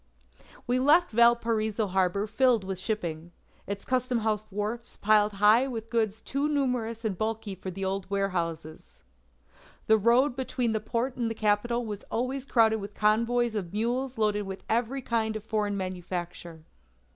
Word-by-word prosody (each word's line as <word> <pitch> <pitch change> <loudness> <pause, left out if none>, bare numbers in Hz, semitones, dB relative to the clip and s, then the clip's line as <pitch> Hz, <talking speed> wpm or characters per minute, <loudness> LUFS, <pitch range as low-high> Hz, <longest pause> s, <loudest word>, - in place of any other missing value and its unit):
"We 250 +1 +1
left 300 +7 +4
Valparaiso 230 -2 +3
harbour 190 +1 +1
filled 230 0 +2
with 190 -1 -4
shipping; 175 -5 -4 0.3
its 200 0 -5
customhouse 235 -4 0
wharfs 215 +4 -4
piled 210 0 +3
high 210 +6 +5
with 225 -3 -6
goods 220 -2 0
too 280 +2 -1
numerous 245 -6 -1
and 210 -3 0
bulky 215 0 -3
for 190 0 -7
the 190 +1 -4
old 190 0 -3
warehouses. 170 -5 -3 0.8
The 220 0 +4
road 240 +5 +3
between 255 -2 -1
the 220 - 0
port 235 +4 -2
and 235 -2 0
the 225 - -4
capital 220 +3 +1
was 210 -2 -6
always 255 +3 -3
crowded 225 -4 +3
with 200 -1 -8
convoys 230 +2 +2
of 195 -5 -4
mules 245 +4 -1
loaded 210 -2 0
with 190 0 -7
every 245 +4 0
kind 220 -2 0
of 215 - -5
foreign 210 -2 -1
manufacture. 175 -3 -5
220 Hz, 155 wpm, -28 LUFS, 200-240 Hz, 0.8 s, high